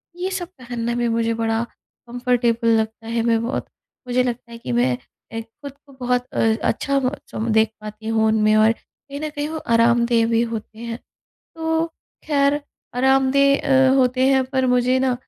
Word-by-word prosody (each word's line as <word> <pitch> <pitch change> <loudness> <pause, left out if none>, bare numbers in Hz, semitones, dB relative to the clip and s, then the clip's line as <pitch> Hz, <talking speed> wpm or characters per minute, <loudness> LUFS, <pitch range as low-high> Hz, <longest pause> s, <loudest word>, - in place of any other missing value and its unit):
ये 370 +2 -3
सब 365 -2 -3
पहनना 235 -2 -3
भी 240 - +1
मुझे 230 0 +1
बड़ा 225 0 0 0.4
कम्फर्टेबल 240 -1 0
लगता 220 +1 -4
है 230 0 0
मैं 230 -1 +2
बहुत 245 - -3 0.4
मुझे 250 0 +2
लगता 240 -1 -4
है 230 - -8
कि 180 - -6
मैं 125 +1 +2 0.4
ए 225 - -3
ख़ुद 245 +5 -11
को 275 - -17
बहुत 250 0 0
अ, - - 0 0.3
अच्छा 280 0 0
बहुत 260 +2 -4 0.2
देख 220 -1 +4
पाती 215 +1 -8
हूँ 225 0 +2
उनमें 215 0 +3
और 215 +1 +5
कहीं 280 +4 -12
न 310 - -2
कहीं 295 -1 -4
वो 320 - -4 0.2
आरामदेह 235 0 +3
भी 230 0 +2
होते 225 -1 -6
हैं। 235 0 -5 0.6
तो 320 0 0 0.4
खैर 285 -1 +2 0.4
आरामदेह 265 0 +4
अ, - - +4
होते 255 0 +3
हैं 265 -1 +4
पर 260 0 0
मुझे 250 +1 +3
ना, 260 -1 +2
245 Hz, 175 wpm, -21 LUFS, 230-270 Hz, 0.6 s, और